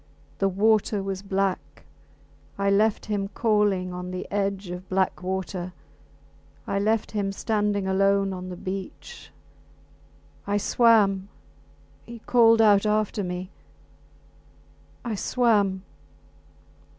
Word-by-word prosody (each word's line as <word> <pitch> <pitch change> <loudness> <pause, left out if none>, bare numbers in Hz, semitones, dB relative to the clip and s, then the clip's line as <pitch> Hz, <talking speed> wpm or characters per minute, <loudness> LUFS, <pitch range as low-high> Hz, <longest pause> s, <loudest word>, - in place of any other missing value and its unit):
The 195 - +2
water 210 +1 +2
was 195 -1 -4
black. 195 -1 -2 0.7
I 200 0 +1
left 210 +2 +2
him 205 -2 -2
calling 205 -4 0
on 180 0 -6
the 185 0 -5
edge 195 -2 -2
of 180 +1 -8
black 190 -1 0
water.... 185 -1 -4 0.9
I 200 - -1
left 215 +2 0
him 200 -2 -1
standing 205 -1 -1
alone 195 0 +2
on 185 0 -7
the 180 - -6
beach. 195 - -7 1.2
I 205 0 +1
swam... 205 -3 +3 0.8
he 235 - -8
called 230 -1 +4
out 205 -1 +4
after 210 -1 0
me... 180 +1 -5 1.5
I 235 - -2
swam 205 -4 +1
200 Hz, 110 wpm, -25 LUFS, 190-210 Hz, 1.5 s, called